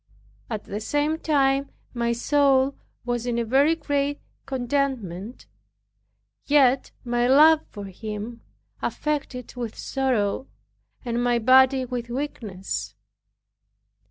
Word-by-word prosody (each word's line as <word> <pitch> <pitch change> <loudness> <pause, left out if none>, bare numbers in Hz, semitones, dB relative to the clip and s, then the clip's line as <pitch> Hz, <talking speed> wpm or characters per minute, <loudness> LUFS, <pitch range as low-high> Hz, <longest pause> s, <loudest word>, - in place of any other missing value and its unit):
At 215 -3 -4
the 205 - -5
same 295 +7 0
time 275 -3 +2 0.2
my 235 -1 0
soul 275 +2 +3 0.3
was 240 0 -2
in 240 -1 0
a 235 - 0
very 275 +7 +3
great 285 -2 -1 0.3
contentment, 245 -6 -2 1.0
yet 275 -3 +4 0.2
my 240 0 +1
love 305 +4 +6
for 205 -2 -8
him 215 +4 -7 0.4
affected 280 -5 -3
it - - -22
with 235 -3 -5
sorrow, 260 -3 -1 0.6
and 240 0 -1
my 245 -1 +2
body 260 +2 +5
with 245 -1 -5
weakness. 230 -8 -4
250 Hz, 110 wpm, -24 LUFS, 235-280 Hz, 1.0 s, love